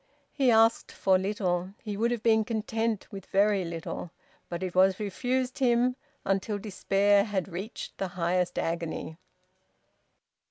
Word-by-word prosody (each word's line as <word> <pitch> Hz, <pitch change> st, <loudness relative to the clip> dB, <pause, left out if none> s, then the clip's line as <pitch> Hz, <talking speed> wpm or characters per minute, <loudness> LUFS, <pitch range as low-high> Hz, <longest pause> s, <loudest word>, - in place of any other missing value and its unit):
He 270 Hz, -3 st, +2 dB
asked 225 Hz, 0 st, +4 dB
for 190 Hz, -1 st, +2 dB
little; 190 Hz, -1 st, -1 dB
he 210 Hz, -2 st, -4 dB
would 225 Hz, +3 st, +1 dB
have 240 Hz, -2 st, -2 dB
been 220 Hz, -1 st, +4 dB
content 225 Hz, -1 st, -2 dB
with 195 Hz, -2 st, -8 dB
very 200 Hz, 0 st, +3 dB
little; 170 Hz, 0 st, -5 dB, 0.4 s
but 175 Hz, +1 st, -4 dB
it 185 Hz, -1 st, -3 dB
was 190 Hz, 0 st, +4 dB
refused 250 Hz, +6 st, -2 dB
him 250 Hz, -1 st, +3 dB, 0.3 s
until 195 Hz, +2 st, 0 dB
despair 200 Hz, 0 st, +2 dB
had 200 Hz, -4 st, -2 dB
reached 195 Hz, +5 st, -7 dB
the 195 Hz, -, -1 dB
highest 180 Hz, 0 st, -1 dB
agony. 165 Hz, -1 st, -3 dB
200 Hz, 135 wpm, -28 LUFS, 185-225 Hz, 0.4 s, asked